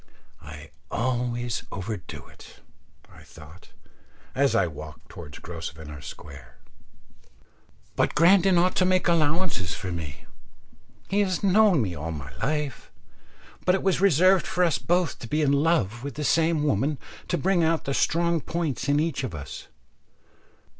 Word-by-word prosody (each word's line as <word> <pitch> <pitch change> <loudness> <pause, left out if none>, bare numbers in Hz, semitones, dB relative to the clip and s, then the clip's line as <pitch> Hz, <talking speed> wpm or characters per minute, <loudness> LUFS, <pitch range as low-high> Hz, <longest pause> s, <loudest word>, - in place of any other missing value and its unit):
I - - -11 0.2
always 120 0 -1
overdo 100 -1 -6
it, - - -15 0.5
I - - -16
thought, 80 +3 -15 0.6
as 140 0 +2
I - - +4
walked 75 -1 -9
towards 70 0 -10
Grosvenor 80 -3 -8
Square, 65 -1 -11 1.4
but - - +1
Grandon 185 +3 +5
ought 180 +2 +2
to 185 - +4
make 185 0 +2
allowances 160 - +1
for 90 - -5
me. 80 -4 -6 0.8
He 200 - 0
has 190 -3 0
known 195 - +5
me 95 -4 -3
all 80 +1 -5
my 70 -4 -8
life, 150 - -3 0.7
but 180 - +3
it 190 - -3
was 190 -2 +1
reserved 185 0 +4
for 180 - +1
us 170 -3 +2
both 175 0 0
to 115 - -8
be 150 +5 0
in 140 - +3
love 140 - +1
with 140 -3 -5
the 150 - -4
same 160 +1 +2
woman 145 +2 +1 0.3
to 175 - 0
bring 180 -1 +2
out 160 0 +1
the 140 - -2
strong 170 +2 +1
points 150 -6 -2
in 145 +1 +3
each 155 -3 -1
of 120 -10 -4
us. 70 - -8
145 Hz, 150 wpm, -26 LUFS, -, 1.4 s, Grandon